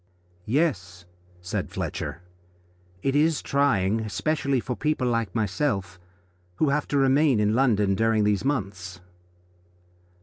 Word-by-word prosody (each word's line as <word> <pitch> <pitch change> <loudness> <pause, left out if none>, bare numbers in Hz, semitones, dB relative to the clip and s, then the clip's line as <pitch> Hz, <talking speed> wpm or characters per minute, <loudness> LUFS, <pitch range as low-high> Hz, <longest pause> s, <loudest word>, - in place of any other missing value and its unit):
"Yes," 95 - -1 0.4
said 90 - -3
Fletcher, 90 - -5 0.8
"it 135 0 0
is 155 +1 +2
trying, 115 -7 +1
especially 140 +5 -1
for 125 +1 -4
people 150 -3 -1
like 115 -2 -1
myself, 100 -3 -1 0.6
who 155 - +1
have 145 +1 0
to 145 - 0
remain 135 -2 +3
in 105 0 +2
London 110 -6 +2
during 110 +1 +2
these 105 -1 +1
months." 95 -10 -3
115 Hz, 115 wpm, -25 LUFS, 100-140 Hz, 0.8 s, remain